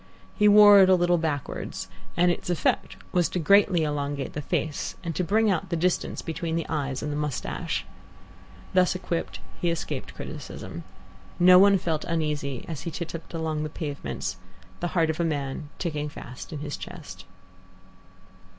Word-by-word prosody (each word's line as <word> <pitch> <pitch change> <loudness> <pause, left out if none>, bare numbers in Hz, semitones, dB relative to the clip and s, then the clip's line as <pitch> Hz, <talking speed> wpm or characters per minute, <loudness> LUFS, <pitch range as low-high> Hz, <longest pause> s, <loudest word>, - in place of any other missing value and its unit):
He 210 - +4
wore 205 -1 +9
it 190 -1 +7
a 185 - +7
little 175 -1 +3
backwards, 150 -4 -3 0.3
and 175 +1 +5
its 175 - -4
effect 175 -4 0
was 175 -2 +2
greatly 185 +1 +4
to - - +2
elongate 145 -1 -2
the 150 - -3
face 150 +1 -2
and 170 -1 -3
to 180 - 0
bring 215 +4 +3
out 170 -3 -1
the 170 - 0
distance 175 +2 0
between 165 0 -3
the 165 - -1
eyes 140 -4 -2
and 150 - -2
the - - -2
moustache. 150 -2 -2 0.9
Thus 185 -1 +4
equipped, 180 -2 -3 0.2
he 175 - +2
escaped 165 -1 -4
criticism. - - -7 0.5
No 180 +1 +8
one 200 0 +7
felt 160 -4 -1
uneasy 150 -5 -2
as 160 -4 -5
he - - -4
titupped 165 0 -6
along 160 -2 -2
the 155 - -2
pavements, 145 -2 -4 0.4
the 175 - -1
heart 160 -1 +4
of 160 - -8
a - - +2
man 145 -2 -2
ticking 150 -4 -2
fast 125 -3 -9
in 150 -3 -5
his 145 -1 -4
chest. 145 - -9
165 Hz, 170 wpm, -26 LUFS, 150-180 Hz, 0.9 s, wore